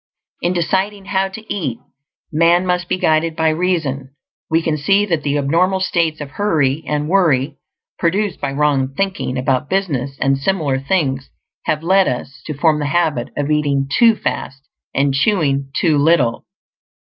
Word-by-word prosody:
In 175 - 0
deciding 190 +3 -1
how 195 0 0
to 220 +3 -7
eat, 145 - -3 0.5
man 170 +3 +3
must 180 -1 -1
be - - +1
guided 160 -1 +1
by 160 -1 +2
reason. 155 -6 -1 0.3
We 165 0 +2
can 160 -2 0
see 195 +8 +2
that 165 -6 -1
the 145 0 -1
abnormal 170 +7 +1
states 165 -4 0
of 145 -2 -7
hurry 155 -7 0
and 150 0 -1
worry 155 -6 +2 0.4
produced 195 +2 0
by 140 - -2
wrong 140 -2 +1
thinking 195 -8 -2
about 130 +2 0
business 140 -9 -1
and 135 0 +1
similar 145 -4 0
things 135 -3 -1 0.4
have 155 0 -1
led 190 +2 +4
us 130 +2 -4
to 155 - -4
form 155 0 +2
the 145 - -1
habit 150 -5 0
of 145 +1 -1
eating 145 -2 +1
too 230 -2 +5
fast, 135 -8 -4 0.3
and 135 0 +1
chewing 140 -5 +1
too 155 -4 +2
little. 140 -6 +2
155 Hz, 160 wpm, -18 LUFS, 140-180 Hz, 0.5 s, too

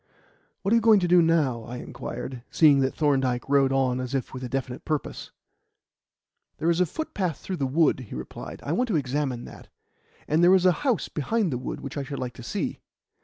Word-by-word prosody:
"What 195 - 0
are - - +7
you - - +2
going 220 -2 +6
to 175 - +1
do 175 0 +6
now?" 155 -8 +2
I 120 +3 -7
inquired, 125 0 -6
seeing 150 -4 +5
that 130 0 0
Thorndyke 135 -5 +1
rode 135 -1 +3
on 130 -2 +1
as 130 +1 -3
if 130 - -3
with 130 0 -6
a 125 - -4
definite 130 -1 -4
purpose. 155 -2 -3 1.3
"There 170 - +1
is 170 - 0
a 180 - +3
footpath 185 - -3
through 185 - -5
the 135 - 0
wood," 150 +1 +3
he 125 - -8
replied. 70 +5 -8
"I 145 - -2
want 250 +10 +1
to 215 - 0
examine 135 -3 -1
that. - - -12 0.6
And 160 +3 +2
there 180 +2 +7
is 185 -1 +2
a 185 - +7
house 250 - +1
behind 185 - -1
the 125 - -2
wood 125 - -5
which 135 - -6
I 140 - -1
should 140 0 -6
like 125 -1 -4
to - - -11
see." 120 - -3
140 Hz, 220 wpm, -26 LUFS, 130-170 Hz, 1.3 s, are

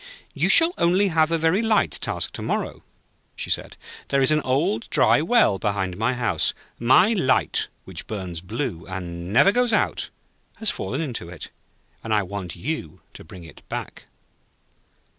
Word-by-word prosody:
'You - - 0
shall 335 +1 +7
only 185 +4 +3
have 160 -1 +2
a 165 - +2
very 165 +6 +2
light 220 -2 +2
task - - -2
to - - -6
morrow,' - - -3 0.5
she - - -4
said. - - -2 0.3
'There 140 -1 +1
is 130 - +4
an 155 0 +3
old, 130 -4 -1
dry 115 +7 +4
well 165 - +3
behind 95 -3 -2
my 115 +6 0
house. 115 -10 0 0.2
My 130 - +5
light, 135 -11 +1 0.2
which - - -6
burns 90 -6 -5
blue, 95 - -4
and 90 -1 -6
never 160 - +5
goes 245 +1 +1
out, - - 0 0.5
has 220 - +1
fallen 130 +11 -4
into 120 - -5
it, 90 - -9 0.5
and 110 -1 0
I 105 - +2
want 95 -2 -6
you 105 - -5
to - - -11
bring 90 +2 -12
it 80 - -14
back.' - - -7
120 Hz, 165 wpm, -23 LUFS, -, 0.5 s, shall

